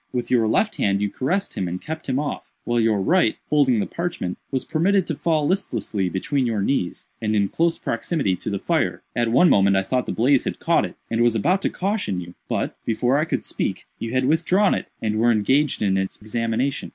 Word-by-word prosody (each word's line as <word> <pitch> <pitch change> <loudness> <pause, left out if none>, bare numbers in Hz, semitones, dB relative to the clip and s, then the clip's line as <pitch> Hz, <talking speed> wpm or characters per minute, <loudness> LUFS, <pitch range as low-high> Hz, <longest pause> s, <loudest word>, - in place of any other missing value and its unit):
With 125 -1 -3
your 115 -3 +3
left 210 - +1
hand 100 -1 +1
you 100 -1 -1
caressed 180 +10 -1
him 95 - -2
and 90 +1 -4
kept 160 +3 -6
him 130 - +1
off, 145 0 -4
while 120 0 0
your 110 -2 +2
right, 170 - +3 0.2
holding 135 -6 +4
the - - 0
parchment, 170 - -4
was 130 -2 -2
permitted 185 +4 +2
to 160 - -3
fall 155 -1 +1
listlessly 115 - -1
between 130 - -1
your 110 -4 0
knees, 100 -8 -1
and 110 -1 0
in 100 -2 +2
close 165 0 +1
proximity 115 - -1
to - - -5
the 100 - -1
fire. - - -1
At 120 -1 +1
one 175 +9 +6
moment 100 - +4
I 95 - +2
thought 125 +4 -1
the - - -1
blaze 130 +4 +3
had - - -3
caught - - +2
it, - - -8 0.2
and 115 0 +1
was 120 -1 +3
about 180 +11 +2
to - - +1
caution 195 - -2
you, 90 0 -8 0.2
but, - - -1
before 125 +4 +1
I 155 - +1
could - - -2
speak, - - -3
you 115 - -4
had 130 0 +1
withdrawn 175 +7 +3
it, - - -3 0.2
and 110 0 0
were 120 +1 +4
engaged 130 +6 +2
in 95 -2 +2
its 95 0 -4
examination. 115 +5 -2
120 Hz, 225 wpm, -23 LUFS, 105-155 Hz, 0.2 s, one